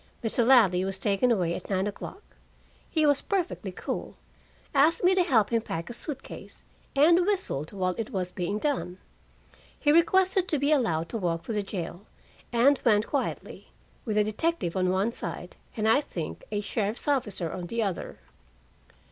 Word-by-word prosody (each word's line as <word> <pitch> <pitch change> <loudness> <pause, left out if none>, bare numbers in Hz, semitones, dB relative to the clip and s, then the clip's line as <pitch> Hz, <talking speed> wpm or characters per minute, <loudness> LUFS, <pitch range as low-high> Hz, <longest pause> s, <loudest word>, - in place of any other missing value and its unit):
Mr. 235 +2 +2
Ladley 220 -8 +5
was 195 0 -3
taken 205 +4 +1
away 180 -6 +1
at - - -7
nine 190 -1 +1
o'clock. 210 - -7 0.7
He 315 -2 +2
was 285 -2 +3
perfectly 375 -3 -2
cool, - - -5 0.6
asked 305 +5 +4
me 365 +1 +5
to 375 - +3
help 230 - +3
him 230 -1 +2
pack 165 -2 -5
a - - -6
suit 275 +3 -6
case, - - -10 0.3
and 335 +5 +5
whistled 365 - -1
while 185 -2 -1
it 225 - -3
was 185 -6 -3
being 180 +3 -2
done. 235 -9 -2 0.8
He 295 - +3
requested 370 +3 +3
to 310 - +1
be 285 +2 +1
allowed 170 - +1
to 225 - -3
walk 170 -3 -1
to 230 - -4
the 210 - 0
jail, 195 -1 -6 0.4
and 260 +4 +4
went 215 -3 +4
quietly, 280 -3 -4 0.3
with 215 -3 -2
a 210 - +5
detective 215 - -1
on 185 -1 +1
one 190 +5 +1
side - - -6 0.2
and 215 0 +1
I 270 +6 +5
think 170 - -6
a 205 -1 -1
sheriff's 210 +3 -2
officer 205 - 0
on 180 -2 -5
the 230 +4 -1
other. 195 -4 -4
225 Hz, 175 wpm, -27 LUFS, 190-285 Hz, 0.8 s, Ladley